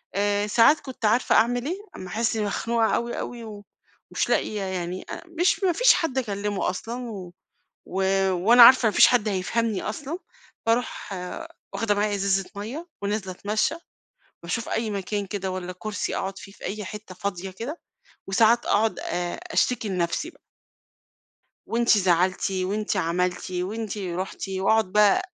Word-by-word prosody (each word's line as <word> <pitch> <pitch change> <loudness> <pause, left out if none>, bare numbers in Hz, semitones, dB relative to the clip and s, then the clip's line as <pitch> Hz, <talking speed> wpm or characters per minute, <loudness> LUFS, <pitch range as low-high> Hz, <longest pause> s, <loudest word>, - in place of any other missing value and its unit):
آآ 205 +1 +1
ساعات 230 +8 +5
كنت 255 -4 -6
عارفة 225 +4 +3
أعمل 245 +2 +3
إيه، 350 +6 -2 0.2
أمّا 185 - -7
احس 225 +4 -1
مخنوقة 225 +2 +1
أوي 235 0 -2
أوي 240 -1 -6
و 210 -2 -9 0.5
ومش - - 0
لاقية 210 -1 0
يعني 185 -1 -4
أ - - -6 0.2
مش 365 +2 +2
ما 365 - +4
فيش - - +6
حد 295 -6 -1
اكلمه 205 -5 -1
أصلًا، 235 +6 -5
و 185 -4 -8 0.5
و 190 +1 -2 0.3
وأنا 225 +7 +7
عارفة 255 -1 +8
ما - - +2
فيش - - +7
حد 240 -4 +2
هيفهمني 210 +2 -1
أصلًا، 290 +9 -4 0.5
باروح 230 -3 -1 0.6
واخده 210 -2 +1
معايا 205 0 +1
إزازة 195 -1 +1
مَيّة، 245 +12 -6
ونازلة 200 -2 -2
اتمشى، 210 - -1 0.7
باشوف 230 +7 -3
أي 225 -1 -1
مكان 200 0 -2
كده 190 -1 -3
والّا 180 -1 -5
كرسي 215 -1 -3
اقعُد 195 +1 -3
فيه 195 - -11
في - - -17
أي 210 0 -4
حتة 210 -3 -8
فاضية 190 -1 -4
كده 245 - -6 0.5
وساعات 225 +4 +4
اقعُد 215 -3 +2
آآ 175 0 -3 0.2
أشتكي 245 -7 +1
لنفسي 180 - -1
بقى. - - -25 1.3
وأنتِ 235 -2 +3
زعلتِ، 185 +1 +2
وأنتِ 195 +3 -1
عملتِ، 180 +1 -1
وأنتِ 205 +4 -3
رُحتِ، 185 +1 -4
واقعُد 195 0 +2
بقى 210 -1 +5
210 Hz, 155 wpm, -25 LUFS, 190-230 Hz, 1.3 s, عارفة